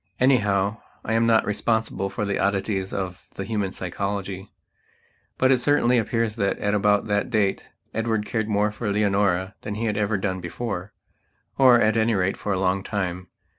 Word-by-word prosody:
Anyhow, 105 -5 +2 0.3
I 115 - -1
am 115 +1 +3
not 115 -1 +4
responsible 105 -1 -1
for 105 - -3
the 100 - -1
oddities 95 -1 0
of 95 -2 -5
the 100 - -4
human 100 -2 -2
psychology. 95 +1 -4 0.9
But 130 0 +3
it 130 - +4
certainly 125 -2 +3
appears 115 0 -1
that 100 -2 0
at 100 - -1
about 105 0 +2
that 105 -1 0
date 105 -5 0 0.2
Edward 110 -1 -1
cared 110 0 -2
more 105 0 +2
for 105 0 -3
Leonora 100 -2 +1
than 105 - -5
he 115 +2 -2
had 105 -2 -1
ever 105 0 +1
done 95 -1 -2
beforeor, 100 +1 -5 0.7
at 120 -4 +5
any 110 0 +2
rate, 95 0 +1
for 105 - -4
a 95 - +1
long 95 +1 +1
time. 95 -3 -3
105 Hz, 170 wpm, -24 LUFS, 95-110 Hz, 0.9 s, at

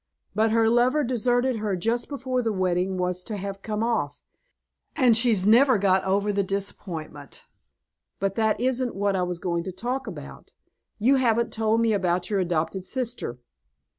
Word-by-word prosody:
But 220 +1 +2
her 225 0 +3
lover 245 +6 +3
deserted 245 0 +1
her 210 -3 -1
just 230 +7 -1
before 260 -3 -2
the 225 -2 -1
wedding 185 -1 0
was 180 0 -1
to 215 - -4
have 195 0 -6
come 215 +1 -3
off, 185 -12 -1 0.8
and 250 -6 +4
she's 225 -5 +3
never 245 +4 +5
got 190 -1 +2
over 200 +2 +1
the 200 - +1
disappointment. 180 -7 -5 0.8
But 195 0 0
that 220 0 +1
isn't 255 0 0
what 200 0 0
I 185 - 0
was 180 -1 -2
going 170 -1 -2
to 190 - -4
talk 245 +8 -4
about. - - -10 0.4
You 255 +6 +3
haven't 235 -2 +1
told 220 +1 +1
me 225 -1 +2
about 180 -1 0
your 200 - +1
adopted 170 0 -1
sister." 240 - -3
210 Hz, 165 wpm, -25 LUFS, 185-240 Hz, 0.8 s, never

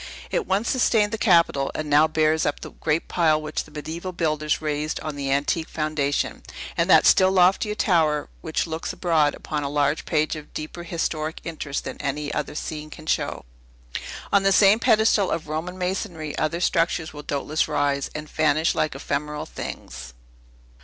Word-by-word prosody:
It - - -1
once 205 +4 +1
sustained 220 -5 +3
the 225 - -2
Capitol, 170 - +3
and 155 - -3
now 150 +2 +5
bears 155 0 +2
up 145 - -1
the - - -8
great 155 +1 -1
pile 160 -3 +2
which 155 0 -4
the - - -16
mediaeval 160 +5 -6
builders 155 -3 0
raised 150 0 -2
on 155 -2 -5
the 140 -1 -2
antique 145 +4 0
foundation, 150 -2 -1 0.3
and - - +1
that - - +7
still 185 0 +6
loftier 190 +3 +3
tower, 160 -7 +2
which 160 -1 -1
looks 160 -1 -4
abroad 160 -5 +2
upon 150 -2 -4
a 140 - -2
larger 145 +1 +1
page 155 0 0
of 150 -1 -11
deeper 155 +3 -6
historic 165 -2 -3
interest 155 -4 -4
than - - -6
any 145 +1 -2
other - - -3
scene 155 0 -5
can 155 0 -11
show. 155 - -1 0.9
On 200 - +6
the 195 0 +3
same 200 +2 +6
pedestal 220 -3 +3
of 165 -1 -2
Roman 160 +4 -4
masonry, 180 -4 -3
other 160 +3 -1
structures 165 -2 +1
will 150 - -7
doubtless 145 +2 -1
rise, 145 -2 0
and 150 0 -5
vanish 155 +1 +2
like 155 - -1
ephemeral 150 +2 -3
things. 65 - -8
155 Hz, 175 wpm, -24 LUFS, 150-170 Hz, 0.9 s, that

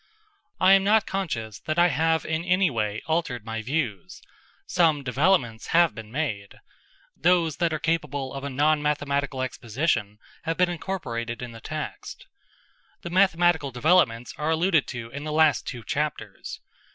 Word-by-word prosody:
I 185 +1 +6
am 195 0 +5
not 210 +1 +4
conscious 115 - -3
that 155 +1 -3
I 175 +1 +5
have 160 +2 +1
in 160 +1 -1
any 180 -1 +2
way 110 -3 -2
altered 155 -9 -1
my 115 0 -4
views. 120 - -3 0.5
Some 160 -5 +2
developments 130 -4 +1
have 170 -2 +5
been 110 -2 -10
made. 115 -9 -3 0.6
Those 170 -3 +2
that 170 -2 +1
are 155 - -1
capable 150 -4 -2
of 135 0 -6
a 140 - -3
non 150 +3 +2
mathematical 140 -2 -1
exposition 120 -3 -2 0.2
have 165 0 -3
been 180 -1 +3
incorporated 125 -10 -4
in 120 - -6
the 115 0 -11
text. - - -6 0.8
The 170 - -6
mathematical 175 -5 +3
developments 125 -3 +2
are 150 +1 -1
alluded 165 -1 +2
to 115 -3 -6
in 140 +3 -6
the 155 - -4
last 155 -1 +3
two 120 -4 -6
chapters. 145 -7 -4
150 Hz, 155 wpm, -25 LUFS, 120-170 Hz, 0.8 s, I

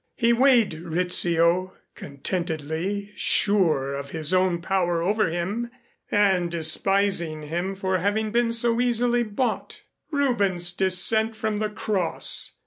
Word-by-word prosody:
He 235 -1 +2
weighed 240 -5 +3
Rizzio 175 +1 +2 0.2
contentedly 170 +6 -4
sure 165 -10 +1
of 140 0 -6
his 160 +2 0
own 185 -2 +1
power 175 -1 -1
over 210 +1 +1
him 195 +8 -3 0.4
and 190 -4 +1
despising 170 0 +1
him 175 +6 -4
for 190 -1 -2
having 210 +3 -1
been 235 0 +1
so 230 0 +2
easily 245 0 +2
bought. 235 +3 -4 0.3
Rubens's 205 - +1
"Descent 195 +5 +2
from 215 -1 -3
the 215 0 -2
Cross"! 205 -4 -3
190 Hz, 120 wpm, -24 LUFS, 170-220 Hz, 0.4 s, weighed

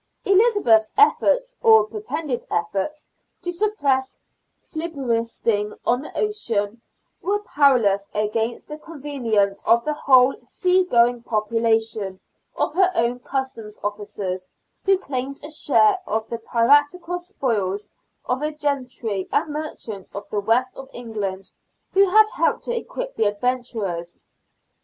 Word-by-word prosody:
Elizabeth's 390 - +4
efforts, - - +3
or 445 -1 +7
pretended 330 - -4
efforts, 195 - -2 0.4
to 355 - -2
suppress 290 -10 0 0.4
filibustering 230 -9 -2
on 245 +2 +2
the 300 - -9
ocean 230 - -1 0.4
were 405 +2 +1
powerless 235 - +3
against 220 +2 -1
the 300 0 -8
connivance 255 -11 -1
of 235 +1 +3
the 305 - 0
whole 260 -3 +5
sea 370 0 +1
going 240 -5 +3
population, 220 -3 0 0.4
of - - -1
her 370 +2 +3
own 235 +2 +1
Customs 245 -5 -5
officers, 205 -3 -4 0.4
who 390 -1 +4
claimed 275 -5 -4
a 300 - -6
share 390 +5 +3
of 220 0 -1
the 235 - -3
piratical 290 +10 +2
spoils, 225 - -2
and - - -35 0.4
of 255 - -2
the 300 +1 -2
gentry 250 -9 -2
and 300 - 0
merchants 230 -10 -6
of 200 - -6
the 210 - 0
West 235 +5 +1
of 270 0 -10
England, 200 -5 -5 0.4
who 390 0 +5
helped 430 +2 +3
to 480 - -2
equip - - -5
the 220 - +1
adventurers. 205 -6 -2
250 Hz, 125 wpm, -22 LUFS, 215-320 Hz, 0.4 s, or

